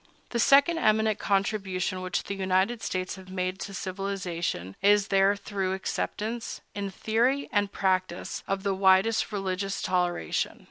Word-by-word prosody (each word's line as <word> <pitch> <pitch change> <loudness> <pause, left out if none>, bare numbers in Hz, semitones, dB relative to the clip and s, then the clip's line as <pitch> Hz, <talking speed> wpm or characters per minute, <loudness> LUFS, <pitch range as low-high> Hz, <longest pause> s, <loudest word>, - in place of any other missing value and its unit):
The 235 - -1
second 280 +7 +5
eminent 215 -3 +2
contribution 195 -2 0
which 185 0 -2
the - - -4
United 190 +4 +1
States 185 +1 -3
have 185 0 -12
made 185 0 -2
to 200 - -5
civilization 180 - -3
is 205 0 +4
their 195 +1 +4
thorough 195 -2 -2
acceptance, 215 +4 -3
in 200 -1 -3
theory 235 +8 +1
and 205 -2 +1
practice, 185 -2 -1
of 195 0 -2
the 200 -1 +1
widest 190 +4 +3
religious 195 -1 -2
toleration. 180 - -1
195 Hz, 140 wpm, -27 LUFS, 185-210 Hz, -, second